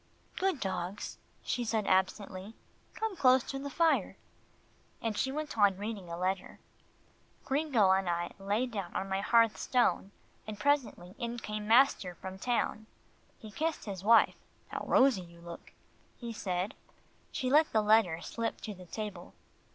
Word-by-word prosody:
"Good 380 -6 0
dogs," 190 0 -4 0.2
she 245 - -1
said 220 -2 0
absently, 190 +2 0 0.4
"come 440 -3 -2
close 255 -5 +5
to 270 - -5
the 280 +1 -5
fire," 330 +3 +1 0.8
and 225 -2 -2
she 265 - 0
went 305 +1 -4
on 200 -3 +4
reading 205 -3 -5
a 170 - -5
letter. 185 +1 -2 0.9
Gringo 270 -9 +3
and 190 -1 +2
I 175 0 -1
lay 205 +5 0
down 200 -8 -6
on 195 - -1
my 190 0 0
hearth 230 +1 +4
stone, 245 -5 +1 0.4
and 210 -1 -6
presently 255 -10 0
in 235 0 -3
came 210 -2 -5
master 225 -6 +4
from 190 +2 -8
town. 220 -2 -1 0.5
He 215 - -11
kissed 320 +6 -2
his 195 -3 -6
wife 230 +2 +5 0.3
"How - - -4
rosy 260 -7 +4
you 170 -1 -14
look," 170 0 -10 0.5
he 235 -2 -6
said. 185 -2 -2 0.6
She 255 0 -2
let 305 +2 +5
the 215 -1 +2
letter 210 -6 +4
slip 230 +5 -3
to 215 - -5
the 180 -2 -13
table. 205 -3 -6
215 Hz, 155 wpm, -31 LUFS, 190-250 Hz, 0.9 s, close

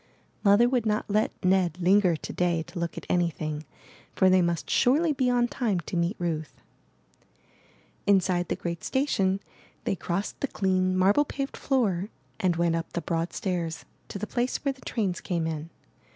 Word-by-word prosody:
Mother 205 +3 +6
would 245 -3 +1
not 210 0 0
let 215 +1 +3 0.2
Ned 180 -2 +3
linger 185 -1 +4
to - - -7
day 175 -2 +1
to 175 +2 -8
look 170 0 -3
at - - -6
anything; 155 -3 -1 0.5
for 190 0 +5
they 185 0 +5
must 170 -2 -1
surely 300 +6 +3
be 260 -2 +1
on 245 -1 +3
time 225 -7 -1
to 170 - -6
meet 170 +4 +1
Ruth. 160 -3 -3 1.5
Inside 185 -3 +3
the - - -1
great 170 -1 -5
station, 195 -9 +1 0.4
they - - 0
crossed 185 +2 -3
the 280 - -1
clean, 185 -4 +1
marble 200 +9 +4
paved 275 -1 -4
floor 210 -8 0 0.3
and 180 -2 +2
went 170 0 +1
up 165 -1 -3
the 170 - -2
broad 165 0 -2
stairs 170 -4 -3 0.2
to - - -6
the 205 - -3
place 245 +3 -1
where 275 - +2
the 260 - -21
trains 195 -6 -2
came 170 -3 -1
in. 160 0 -4
185 Hz, 175 wpm, -27 LUFS, 170-215 Hz, 1.5 s, Mother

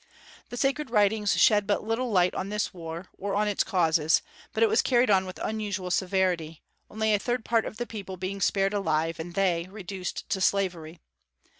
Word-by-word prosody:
The 245 - -7
sacred 275 +1 0
writings 210 -1 +2
shed 205 -2 +5
but 205 - +1
little 225 +3 -1
light 185 -4 +3
on 190 - -3
this 210 0 -2
war, 170 0 -7
or 200 0 -2
on 210 +1 +1
its 205 - +1
causes; 160 -3 +2 0.3
but - - +1
it - - +6
was 440 +1 +3
carried 245 -3 +3
on 190 -1 +3
with 185 - -8
unusual 205 -4 -3
severity, 180 -4 0 0.3
only 220 0 0
a 205 - +3
third 240 +1 -2
part 230 -1 +2
of 215 - -8
the 240 - -3
people 195 -5 -7
being 190 +2 -4
spared 195 0 +2
alive, 165 -4 0
and 170 +2 -7
they 180 -3 +1
reduced 190 -2 -6
to 190 - 0
slavery. 180 -5 0
195 Hz, 190 wpm, -27 LUFS, 180-215 Hz, 0.3 s, it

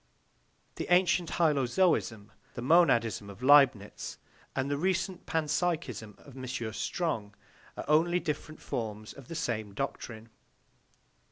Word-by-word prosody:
The - - -4
ancient 180 -1 +3
hylozoism, 140 - +2 0.3
the - - -4
monadism 120 - +3
of 100 +5 -11
Leibnitz, 130 -7 +4 0.4
and 130 - 0
the 145 - 0
recent 185 +3 -1
panpsychism 155 - -1
of 140 - -13
M. 130 -1 -7 0.3
Strong 110 -10 -2 0.4
are - - -5
only 165 +4 +3
different 155 -1 -4
forms 110 -2 -5
of 135 -3 -13
the 165 - -7
same 110 -9 -3
doctrine. 115 -3 -5
140 Hz, 115 wpm, -30 LUFS, 110-165 Hz, 0.4 s, Leibnitz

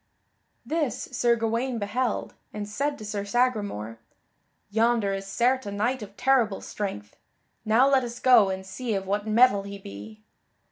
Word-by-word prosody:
This 310 -5 -2
Sir 240 -1 +2
Gawaine 230 +2 -1
beheld, 225 +3 -2 0.2
and 210 -1 -5
said 280 +7 -2
to 215 - -9
Sir 205 -1 -3
Sagramore: 205 - -1 0.7
"Yonder 225 -2 +2
is 195 0 -5
certes 250 +4 +1
a - - -4
knight 230 +5 -1
of 205 -1 -10
terrible 245 -6 +2
strength; 105 - -6 0.5
now 225 +5 +4
let 270 -2 +3
us 240 0 -6
go 240 -6 +6
and 190 0 -4
see 220 +4 -3
of 195 -1 -3
what 205 +2 -2
mettle 215 -1 +5
he 200 0 -8
be." 105 - -11
215 Hz, 155 wpm, -26 LUFS, 200-245 Hz, 0.7 s, go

